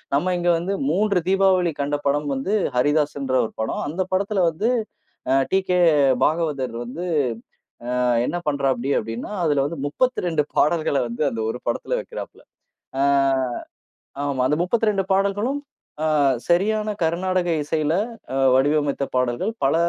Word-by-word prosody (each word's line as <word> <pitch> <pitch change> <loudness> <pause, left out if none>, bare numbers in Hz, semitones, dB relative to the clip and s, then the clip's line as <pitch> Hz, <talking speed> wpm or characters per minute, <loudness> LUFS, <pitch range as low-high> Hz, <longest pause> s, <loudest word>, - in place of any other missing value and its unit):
நம்ம 180 +5 +1
இங்க 175 0 0
வந்து 185 +4 -2
3 195 +1 +2
தீபாவளி 190 -3 +3
கண்ட 145 +1 0
படம் 145 +1 +1
வந்து 135 +10 -2 0.2
ஹரிதாஸ்ன்ற 145 -1 +1
ஒரு - - -8
படம். 110 - -2
அ, - - -4
அந்தப் 185 +4 -3
படத்துல 195 0 +1
வந்து 190 +9 -1 0.6
அ - - +4 0.2
டீகே 190 -1 +1 0.5
பாகவதர் 150 -6 0
வந்து, 125 +9 -6 1.0
அ - - +2 0.2
என்ன 175 - -2
பண்றாப்படி 135 -3 0
அப்டின்னா, 115 +2 -5
அதுல 145 -3 +2
வந்து 160 +2 -5
32 175 - 0
பாடல்கள 155 -2 +2
வந்து 120 +4 -4
அந்த 115 -2 -4
1 125 - -5
படத்துல 120 - -1
வைக்கிறாப்புள்ள. - - -9 0.6
அ - - +3 1.2
ஆமா, 140 -3 -1
அந்த 150 - +2
32 210 +1 +1
பாடல்களும் 205 +8 0 0.4
ஆ - - +2 0.4
சரியான 210 +5 +2
கருநாடக 175 +2 0
இசையில 155 0 0 0.4
அ - - -1 0.2
வடிவமைத்த 145 +1 +2
பாடல்கள். 125 - 0
பல 135 - +3
160 Hz, 135 wpm, -22 LUFS, 140-190 Hz, 1.2 s, அ